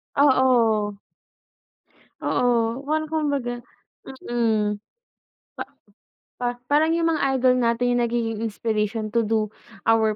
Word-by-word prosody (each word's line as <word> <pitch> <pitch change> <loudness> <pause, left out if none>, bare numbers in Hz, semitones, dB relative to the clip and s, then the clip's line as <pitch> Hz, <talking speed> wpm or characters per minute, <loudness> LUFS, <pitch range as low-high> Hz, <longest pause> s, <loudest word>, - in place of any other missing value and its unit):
Oo. 240 -7 +3 1.2
Oo, 235 0 +1
well, 310 +2 -1
kumbaga, 285 -6 -2 0.6
mm, 215 -3 0 0.7
pa - - -4 0.8
pa 245 0 -1
parang 305 +5 +2
yung 330 0 +2
mga 275 -4 +1
idol 255 -1 +3
natin 240 +1 +1
yung 245 0 +2
nagiging 230 -2 -2
inspiration 215 -1 -2
to 235 - +2
do 215 0 0 0.4
our 220 -1 +3
240 Hz, 105 wpm, -23 LUFS, 220-265 Hz, 1.2 s, Oo